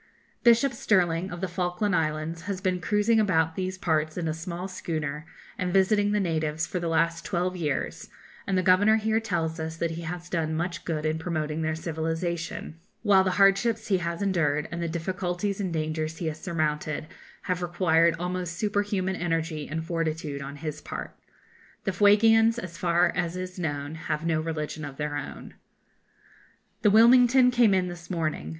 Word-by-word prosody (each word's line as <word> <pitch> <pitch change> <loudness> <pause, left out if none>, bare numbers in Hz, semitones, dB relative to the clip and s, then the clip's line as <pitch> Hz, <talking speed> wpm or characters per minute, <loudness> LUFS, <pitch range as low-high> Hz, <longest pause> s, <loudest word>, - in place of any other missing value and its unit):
] - - -38
Bishop 240 +2 +5
Stirling, 180 -5 +1
of 175 0 -7
the 190 - 0
Falkland 180 +2 -1
Islands, 155 +1 -1
has 195 -2 -2
been 185 -1 -1
cruising 210 +3 +2
about 165 -6 +2
these 185 0 -3
parts 155 -3 0
in 170 -2 -2
a 155 - 0
small 170 +3 -5
schooner, 155 -4 -4 0.3
and 180 -1 -1
visiting 205 +2 +3
the 210 - +2
natives, 160 -3 -1
for 180 - -3
the 170 - -2
last 165 +1 +1
twelve 180 0 -1
years, 150 -6 -3 0.4
and 195 -1 +1
the 185 - +2
Governor 195 +4 +5
here 220 0 +1
tells 170 -7 -2
us 160 0 -4
that 165 0 -1
he 165 +1 -5
has 175 +1 -6
done 160 -3 -1
much 170 +2 -3
good 155 -2 -2
in 155 +1 0
promoting 160 -2 -2
their 160 0 -1
civilisation; 165 0 -3 0.2
while 200 -3 +5
the 190 - +1
hardships 215 +3 +3
he 190 -2 +3
has 170 +2 -3
endured, 155 -6 +1
and 170 0 -4
the 170 - -1
difficulties 180 +3 -2
and 185 -3 -2
dangers 155 0 -2
he 175 - -4
has 155 0 -4
surmounted, 155 -3 -2 0.4
have 180 -1 -2
required 170 -1 +3
almost 180 0 -3
superhuman 205 -2 0
energy 165 -3 -2
and 160 +2 -3
fortitude 160 -4 -2
on 140 +1 -7
his 150 0 -6
part. - - -7 0.7
The 195 - 0
Fuegians, 225 +4 +5
as 180 -7 -6
far 175 -1 +2
as 175 0 -1
is 185 0 -6
known, 145 -3 -3 0.2
have 150 +1 -1
no 160 -2 +1
religion 155 -1 -4
of 140 -2 -7
their 150 -1 -2
own. 145 - -7 1.3
The 210 - +5
'Wilmington' 245 +3 +6
came 235 -5 +4
in 185 -1 +1
this 175 -1 -9
morning. 155 - -2
170 Hz, 180 wpm, -27 LUFS, 160-190 Hz, 1.3 s, Wilmington